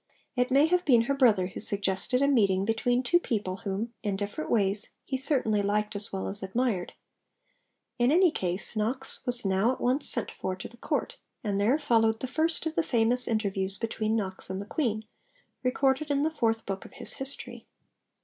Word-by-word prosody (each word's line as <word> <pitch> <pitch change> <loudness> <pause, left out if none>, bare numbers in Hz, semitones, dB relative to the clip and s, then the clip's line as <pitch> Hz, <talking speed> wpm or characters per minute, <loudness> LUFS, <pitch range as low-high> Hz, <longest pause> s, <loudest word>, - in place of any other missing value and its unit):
It 250 0 +1
may 275 +3 +5
have 360 +2 +2
been 245 -8 +5
her 240 +4 0
brother 230 -9 +4
who 185 - -7
suggested 200 +6 +1
a - - +4
meeting 200 -8 +3
between 245 +3 +1
two 345 +8 +3
people 205 - -2
whom, 215 +3 -4
in 205 -2 -1
different 205 +9 -4
ways, 205 -1 +2
he 270 - -3
certainly 255 -6 +3
liked 210 +1 -1
as 205 0 -3
well 190 -1 -3
as 200 +1 -5
admired. 195 -1 -1 1.1
In 240 +2 +4
any 355 +1 +5
case, 185 - -3
Knox 235 +5 -2
was 245 -2 -1
now 195 +5 +2
at 260 - -5
once 260 +4 +1
sent 235 - +1
for 185 - -4
to 185 - -7
the 235 - -16
Court, - - -3 0.2
and 200 -2 -1
there 240 +8 +3
followed 225 -6 +2
the - - -3
first 320 +6 0
of 320 - -2
the 335 - +1
famous 245 -3 +2
interviews 195 -3 0
between 220 -1 -1
Knox 190 -4 -3
and 190 0 -3
the 200 - -6
Queen, 220 -4 -2 0.6
recorded 265 +3 +1
in 285 0 +1
the 315 - +1
Fourth 225 -6 0
Book 195 -1 -4
of - - -14
his - - -2
History. 270 +1 -5
225 Hz, 195 wpm, -28 LUFS, 200-265 Hz, 1.1 s, may